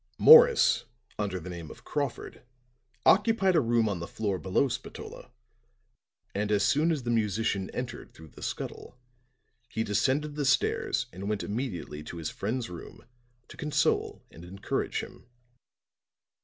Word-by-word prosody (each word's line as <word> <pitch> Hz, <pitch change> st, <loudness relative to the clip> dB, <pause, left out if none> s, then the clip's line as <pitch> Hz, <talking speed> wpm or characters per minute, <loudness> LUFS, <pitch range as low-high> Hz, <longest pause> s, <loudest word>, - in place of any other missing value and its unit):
"Morris, 475 Hz, 0 st, +7 dB, 0.3 s
under 100 Hz, -3 st, -2 dB
the 90 Hz, +2 st, -8 dB
name 85 Hz, -3 st, -8 dB
of -, -, -13 dB
Crawford, 145 Hz, -2 st, -4 dB, 0.6 s
occupied 200 Hz, -3 st, +4 dB
a 160 Hz, -, +5 dB
room 115 Hz, -2 st, +2 dB
on 100 Hz, -4 st, -2 dB
the 85 Hz, -, -5 dB
floor 100 Hz, -4 st, -2 dB
below 95 Hz, +10 st, +1 dB
Spatola; 125 Hz, -, -8 dB, 1.0 s
and 105 Hz, +1 st, -1 dB
as 100 Hz, -2 st, +3 dB
soon 150 Hz, +5 st, +3 dB
as 150 Hz, -5 st, -2 dB
the 120 Hz, -, -1 dB
musician 105 Hz, -3 st, 0 dB
entered -, -, -6 dB
through 80 Hz, -1 st, -14 dB
the -, -, -15 dB
scuttle, -, -, -6 dB, 0.7 s
he 110 Hz, -, -2 dB
descended 135 Hz, +8 st, 0 dB
the 145 Hz, 0 st, -2 dB
stairs 130 Hz, -, +1 dB
and 95 Hz, +3 st, -5 dB
went 105 Hz, -1 st, -1 dB
immediately 100 Hz, -, -4 dB
to 75 Hz, +3 st, -8 dB
his 80 Hz, -2 st, -4 dB
friend's 115 Hz, +4 st, -3 dB
room 85 Hz, -1 st, -11 dB, 0.4 s
to -, -, -13 dB
console 150 Hz, 0 st, 0 dB
and 80 Hz, -, -13 dB
encourage 95 Hz, +3 st, -3 dB
him. -, -, -12 dB
110 Hz, 145 wpm, -28 LUFS, 95-140 Hz, 1.0 s, Morris